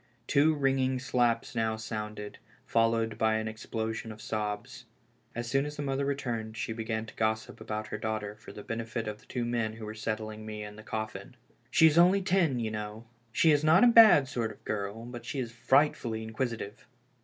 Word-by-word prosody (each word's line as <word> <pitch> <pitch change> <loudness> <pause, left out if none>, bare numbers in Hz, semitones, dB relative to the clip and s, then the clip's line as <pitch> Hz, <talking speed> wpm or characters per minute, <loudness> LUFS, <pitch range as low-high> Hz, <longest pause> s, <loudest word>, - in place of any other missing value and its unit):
Two 155 +3 +4
ringing 135 -2 +1
slaps 120 -2 +1
now 110 -2 0
sounded, 105 -1 -6 0.3
followed 115 -1 +1
by 110 0 +3
an 110 0 -1
explosion 110 +1 -4
of 105 - -10
sobs. 110 +3 -4 0.5
As 120 0 -3
soon 135 +4 +2
as 150 0 -5
the 145 - -3
mother 135 0 -1
returned 115 -6 -3
she 115 - -2
began 110 -1 -3
to - - -12
gossip 110 0 -1
about 110 0 -4
her 105 - -4
daughter 110 -1 -3
for 105 - -12
the 105 - -9
benefit 115 0 -4
of 105 0 -5
the - - -22
two 120 -2 -2
men 120 -2 -1
who 110 -1 -8
were 105 - -5
settling 110 0 -4
me 105 -1 -6
in 105 0 -8
the 110 - -10
coffin. 110 +1 -5 0.2
" - - -36
She 160 - +5
is 160 +1 +6
only 185 +3 +5
ten, 180 -8 +2
you 110 -2 -2
know. 105 +1 -6 0.3
She 160 +7 +4
is 145 0 +3
not 160 +6 +6
a - - +8
bad 225 - +8
sort 120 -5 -2
of 105 - -11
a - - -33
girl, 105 +2 -3
but 120 0 -8
she 155 -5 -4
is 120 -3 -3
frightfully 120 -2 +2
inquisitive. 110 -2 -4
115 Hz, 205 wpm, -30 LUFS, 110-130 Hz, 0.5 s, a